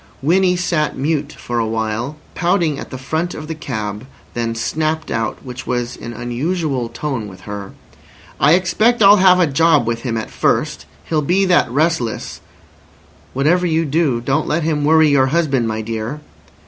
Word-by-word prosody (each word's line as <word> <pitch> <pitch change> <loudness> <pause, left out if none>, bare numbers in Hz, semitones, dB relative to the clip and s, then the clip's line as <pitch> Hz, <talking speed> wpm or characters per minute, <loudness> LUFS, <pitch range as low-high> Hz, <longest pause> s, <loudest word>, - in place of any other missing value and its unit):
Winnie 180 +4 +3
sat 170 -4 -1
mute 145 +1 -1
for 120 -1 -4
a 115 - 0
while, 110 +5 -2 0.2
pouting 170 -4 +1
at - - -8
the 130 - -6
front 160 +7 -3
of 155 - -7
the 160 - -3
cab, 110 -6 -5 0.3
then 115 -1 -2
snapped 155 +6 -2
out, 115 -1 -1
which 125 0 -8
was 120 -1 -2
an 115 - -8
unusual 130 +2 -2
tone 130 -8 -4
with 95 -2 -12
her: 100 -2 -7 0.7
"I 145 +3 +5
expect 215 +6 +3
I'll 200 +1 +8
have 185 -1 +5
a 180 - +5
job 150 -2 +3
with 115 0 -2
him 115 -3 -2
at 110 - -5
first, 70 - 0 0.2
he'll 155 -2 0
be 185 +7 +2
that 175 -9 +3
restless—" 145 -3 -1 0.9
"Whatever 170 +7 +2
you 165 0 +1
do, 145 -4 +1
don't 135 +6 0
let 165 +2 0
him 150 -2 0
worry 160 +1 +5
your 140 -2 +4
husband, 135 -5 +1
my 110 0 -2
dear." 115 +5 -4
145 Hz, 175 wpm, -18 LUFS, 120-165 Hz, 0.9 s, I'll